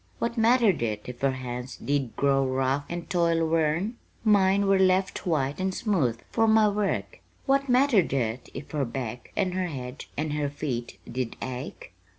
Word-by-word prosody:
"What 235 0 -2
mattered 230 - +4
it 105 -3 -1
if 125 -1 -8
her 135 - +3
hands 125 0 -6
did 140 -4 -1
grow 135 -1 +3
rough 135 +2 0
and 175 0 -5
toil 170 -2 +2
worn? 165 +8 +1 0.3
Mine 200 -2 +4
were 195 -1 +4
left 190 0 +2
white 145 -3 0
and 190 0 -1
smooth 155 - 0
for 225 -1 +3
my 220 -1 +5
work. 205 0 -2 0.3
What 275 0 +2
mattered 250 - +4
it 120 -2 -2
if 140 - -8
her 150 -2 0
back 125 -1 -5
and 190 -3 +1
her 185 0 -1
head 130 -3 -6
and 150 0 -1
her 150 -1 -1
feet 135 -5 -4
did 125 -1 -3
ache? 125 -7 -6
155 Hz, 170 wpm, -27 LUFS, 130-195 Hz, 0.3 s, my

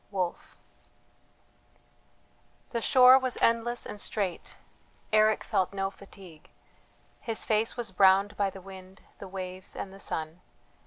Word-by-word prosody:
WOLFE. 185 -3 -4 2.1
The 235 - -2
shore 255 +2 +7
was 255 -2 -2
endless 230 +1 +1
and 205 - -5
straight, 195 -5 -2 0.6
Eric 215 0 +3
felt 185 +1 -1
no 195 0 -2
fatigue; 190 -5 -15 0.7
his 225 -2 -3
face 220 +2 0
was 235 -5 -3
browned 195 +2 +4
by 200 -1 0
the 190 0 -11
wind, 190 0 -13 0.2
the 195 - -8
waves, 185 0 -7
and 195 - -6
the 195 - -13
sun. 160 -1 -5
195 Hz, 125 wpm, -28 LUFS, 185-220 Hz, 2.1 s, shore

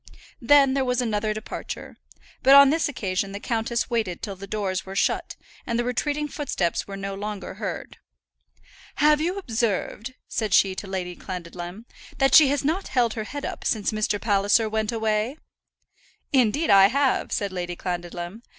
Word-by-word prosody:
Then 275 +2 +5
there 270 -1 +1
was 250 -1 0
another 215 -3 0
departure; 215 +1 -6 0.5
but 270 +1 +7
on 280 -1 +9
this 320 -1 +1
occasion 195 -6 -2
the 200 - -5
countess 230 +1 -1
waited 215 -7 -2
till 200 -3 -4
the 200 +1 -10
doors 195 -3 -2
were 190 0 -8
shut, - - 0 0.3
and 235 - 0
the 240 - +1
retreating 290 +5 -1
footsteps 235 - -2
were 195 0 -6
no 195 0 -4
longer 205 0 -5
heard. - - -6 1.0
"Have 300 0 +4
you 355 +4 -1
observed," 235 - -2
said 215 -4 0
she 195 -1 +4
to 195 +2 -7
Lady 180 -2 -4
Clandidlem, 180 +3 -7 0.3
"that 270 -1 +2
she 310 -3 +9
has 280 0 0
not 340 +7 0
held 240 -4 +1
her 220 -2 -4
head 285 +4 -6
up - - -6
since 215 -3 0
Mr. 215 -1 -1
Palliser 205 +1 +2
went 215 0 -1
away?" 220 +3 -1 1.0
"Indeed 265 +4 +3
I 195 -1 +8
have," 270 +4 +1
said 200 -2 -1
Lady 175 -1 -4
Clandidlem. 175 +3 -5
215 Hz, 170 wpm, -24 LUFS, 195-265 Hz, 1.0 s, on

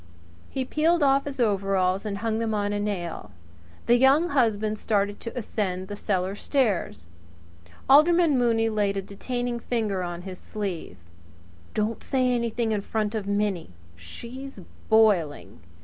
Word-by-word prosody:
He 265 -1 -3
peeled 320 +4 +2
off 275 0 +3
his 280 -2 -6
overalls 195 -3 +1
and 200 -1 -3
hung 220 +1 -1
them 225 -1 -1
on 205 0 -1
a 205 - -1
nail. 175 - -4 0.6
The 240 - +5
Young 280 +7 +5
Husband 215 -5 +1
started 205 -1 0
to 230 - -7
ascend 190 -5 -3
the 205 - -4
cellar 190 -2 -1
stairs. 205 - -1 0.8
Alderman 310 +2 +6
Mooney 230 -2 +2
laid 205 -2 0
a 195 - -2
detaining 245 +4 -3
finger 220 -6 -1
on 175 -1 -5
his 185 -1 -8
sleeve. 200 -6 -5 0.8
"Don't 215 +1 -1
say 255 -2 +1
anything 235 -1 -1
in 210 -2 0
front 215 +1 -2
of 210 -3 -3
Minnie! 200 - -1 0.2
She's 235 - -9 0.3
boiling! 175 - +2
215 Hz, 145 wpm, -26 LUFS, 195-245 Hz, 0.8 s, Alderman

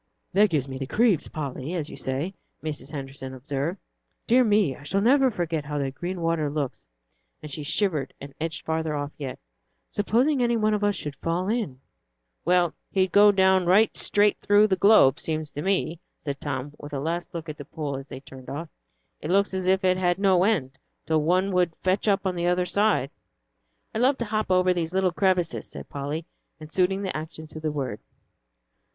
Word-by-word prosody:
"That 205 +2 +5
gives 145 -5 0
me 130 -1 -6
the 135 - -4
'creeps,' 215 - +2
Polly, 145 +2 -5
as 155 -4 -2
you - - -9
say," 140 +8 -2 0.3
Mrs. 150 -2 -5
Henderson 135 -2 -6
observed. 140 +7 -3 0.5
"Dear 250 +2 +5
me, 205 - +3
I - - -15
shall 165 +8 -1
never 260 +5 +4
forget 170 -8 -2
how 150 0 -3
that 135 -2 -2
green 175 +4 -4
water 165 -3 +1
looks;" 145 -3 -4 0.6
and 150 - -7
she 150 - -4
shivered 155 -2 0
and 140 0 -9
edged 165 0 -3
off - - -44
farther 155 -3 -2
yet. 135 -3 -5 0.5
"Supposing 250 +7 +2
any 235 -1 +2
one 210 -1 +2
should 150 -7 -5
fall 175 +3 -1
in!" 210 - -2 0.6
"Well, 175 -1 +3 0.2
he'd 190 -2 +1
go 205 0 +7
down 190 -2 +3
right 205 +5 +4
straight 205 0 +2
through 205 +1 +5
the 195 -3 +2
globe, 195 -8 +6
seems 155 -2 -3
to 145 - -5
me," 185 -3 0 0.2
said 140 -2 -5
Tom, 145 0 -4
with 145 0 -9
a 140 - -1
last 165 +4 -3
look 165 -1 -5
at 155 -1 -7
the 145 - -7
pool 150 -2 -4
as 135 +1 -7
they 130 - -8
turned 130 -2 -12
off, 155 +3 -5 0.5
"It 150 - -5
looks 200 +2 +3
as 185 -1 -2
if 190 +1 +3
it 185 0 +3
had 175 -1 +1
no 190 -2 +4
end, 140 -11 0 0.3
till 160 -1 +2
one 185 +5 +2
would 180 -3 +1
fetch 190 +3 +1
up 200 -1 +2
on 190 - +1
the 175 0 -1
other 180 0 +2
side." 200 -8 +1 0.8
"I 220 - -2
love 265 +3 +3
to 235 - -2
hop 215 -1 -1
over 185 0 +4
these 170 -1 -2
little 190 -1 +3
crevasses," 180 -2 0
said - - -9
Polly, 145 +3 -4 0.3
and 155 0 -11
suiting 190 +2 +2
the 190 - -3
action 160 0 -6
to 155 0 -9
the 155 -1 -2
word. 140 -4 -3
170 Hz, 200 wpm, -26 LUFS, 145-195 Hz, 0.8 s, go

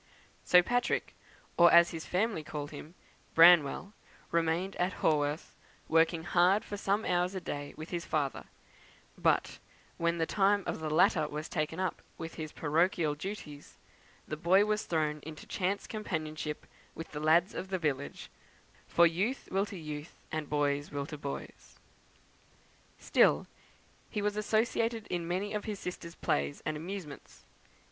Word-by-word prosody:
So 180 0 +6
Patrick, 245 +5 0 0.4
or 175 -1 +7
as 170 0 +7
his 160 -1 -6
family 190 -3 0
called 145 -1 -6
him 155 +3 -10 0.4
Branwell, 170 +3 +6 0.4
remained 170 +3 0
at 180 +1 0
Haworth, 150 -1 +1 0.3
working 165 0 +3
hard 180 +4 +3
for 205 - -5
some 200 +1 0
hours 180 +1 +1
a - - -1
day 145 -4 -6
with 155 +1 -8
his 170 -1 -2
father; 145 -3 -2 0.7
but, - - +1 0.4
when 170 0 +1
the 165 - +1
time 200 +2 +2
of - - -3
the 155 -1 -3
latter 155 0 +3
was 150 +1 -5
taken 155 +3 -2
up 185 -1 -2 0.2
with 165 0 -6
his 155 -1 -6
parochial 160 0 +1
duties, 150 -3 -8 0.5
the 155 - -3
boy 185 +6 +4
was 215 0 0
thrown 155 -2 0
into 155 +1 -9
chance 195 +2 -2
companionship 155 -7 -4 0.3
with 165 - -8
the 150 - -5
lads 160 +4 +3
of 190 - -5
the 190 0 -1
village 145 -5 -3 0.6
for 170 - +5
youth 190 +11 0
will 195 +2 +1
to 200 -1 -8
youth, 150 -1 -7 0.2
and 155 -2 -3
boys 145 -1 0
will 140 -1 -3
to 150 - -7
boys. 140 -1 -7 1.2
Still, - - +3 0.6
he 210 -2 -3
was 205 0 0
associated 225 +1 0
in 170 -1 -2
many 190 +4 -2
of 210 -1 -3
his 210 -2 -3
sisters' 170 -2 -7
plays 70 0 -1
and 155 - -1
amusements. 165 -2 -8
170 Hz, 155 wpm, -31 LUFS, 155-190 Hz, 1.2 s, or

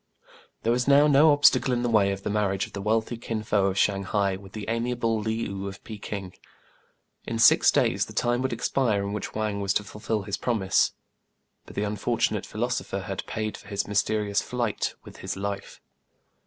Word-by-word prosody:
There 115 - +2
was 125 +1 +1
now 140 +1 +6
no 150 +1 +6
obstacle 145 -2 +4
in 120 - -1
the - - +1
way 105 -4 +3
of 100 0 -5
the - - -2
marriage 100 -2 0
of - - -15
the 100 - -5
wealthy 110 +3 0
Kin 115 -2 -4
Fo 105 -3 +2
of 95 0 -2
Shang 100 -1 +2
hai 100 0 0
with 95 0 -12
the 110 -2 -5
amiable 115 0 0
Le 110 +1 -1 0.2
ou 100 -1 -5
of 100 0 -9
Pekin. 100 -3 -6 0.9
In 115 - -2
six 115 - +6
days - - +2
the - - -11
time 120 +1 +1
would 130 - -1
expire 115 -3 0
in 100 0 -3
which 105 - -5
Wang 105 -2 -1
was 100 0 0
to 105 - +1
fulfil 105 0 -3
his 100 0 -3
promise; 110 -6 +1 0.7
but - - -12
the 105 - 0
unfortunate 105 0 -1
philoso - - -2
pher - - -5
had - - -4
paid 110 -1 -3
for - - -13
his 100 -1 -2
mysterious 105 0 +1
flight 120 -4 -2
with - - -13
his 95 +1 -4
life. 100 0 -5
105 Hz, 200 wpm, -26 LUFS, 100-115 Hz, 0.9 s, now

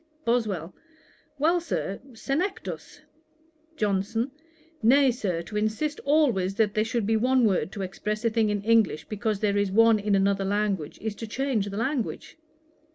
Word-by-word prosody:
BOSWELL. 210 -8 0 0.6
'Well, 335 +5 +2
Sir, 200 - -3
Senectus.' 275 - -4 0.8
JOHNSON. 210 +5 0 0.5
'Nay, 265 +4 +5
Sir, 185 -8 -2
to 210 - -10
insist 215 +9 -1
always 245 -11 +2
that 215 -2 +2
there 215 - +2
should 225 -1 -1
be 225 +2 +2
one 250 +2 +3
word 190 -2 +1
to 200 - -4
express 210 +4 -4
a 230 - +3
thing 220 -1 +2
in 205 -1 -1
English, 225 -7 +2
because 210 -1 -2
there 205 -1 +1
is 205 -1 +1
one 225 +1 +5
in 205 0 +1
another 195 0 +2
language, 200 -5 -1
is 220 -1 -2
to 225 - -6
change 240 -3 -1
the 200 - -6
language.' 260 +5 -3
215 Hz, 160 wpm, -26 LUFS, 200-240 Hz, 0.8 s, Nay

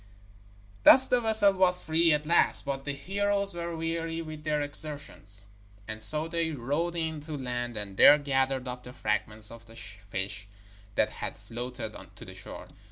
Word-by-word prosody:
Thus 260 - +7
the 250 -1 0
vessel 220 -3 +7
was 185 -1 +4
free 165 +1 +1
at 150 0 -1
last. 170 -1 +3
But 135 -1 -6
the 145 - +1
heroes 200 +5 -2
were 170 0 -7
weary 165 0 -4
with 155 -1 -11
their 150 -1 -2
exertions, 145 -9 -3 0.4
and 110 0 -8
so 155 +8 +7
they 165 -1 -3
rowed 150 +5 -4
in 160 -2 -5
to 150 0 -8
land, 120 -3 -6
and 100 -2 -7
there 145 - +6
gathered 135 -2 -3
up 125 0 -8
the 125 0 -13
fragments 105 -1 -1
of 115 0 -15
the 115 - -17
fish 100 0 -7 0.5
that - - -1
had - - -8
floated 120 -1 -9 0.2
to - - -14
the - - -12
shore. - - -12
145 Hz, 170 wpm, -26 LUFS, 120-165 Hz, 0.5 s, Thus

